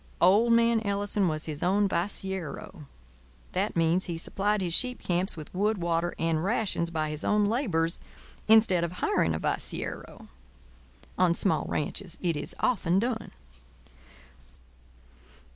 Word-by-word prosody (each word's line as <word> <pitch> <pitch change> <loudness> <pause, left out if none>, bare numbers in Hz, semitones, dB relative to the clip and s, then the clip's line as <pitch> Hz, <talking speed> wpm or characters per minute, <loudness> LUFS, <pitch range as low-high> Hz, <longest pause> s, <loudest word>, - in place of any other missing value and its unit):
Old 205 +7 +5
man 230 -1 +4
Ellison 200 -1 0
was 155 -1 -2
his 150 -2 -4
own 200 +3 +2
vaciero. 190 -4 -4 0.7
That - - -1
means 170 +3 +2
that - - -3
he - - -4
supplied 205 +5 0
his 175 -3 -1
sheep 250 +5 +3
camps 180 0 -1
with 155 - -9
wood, 210 +3 +1
water, 170 0 -1
and 165 -1 0
rations 195 -5 0
by 155 -2 -2
his 150 0 -5
own 210 0 +2
labours 190 - 0 0.5
instead 215 -5 +5
of 170 0 -3
hiring 80 - +1
a - - -3
vaciero. - - -4 0.9
On 175 -2 +4
small 165 -5 +1
ranches 170 +4 -2
it 170 -3 0
is 145 - -3
often 185 -7 +2
done. 225 +1 -1
185 Hz, 140 wpm, -28 LUFS, 165-205 Hz, 0.9 s, Old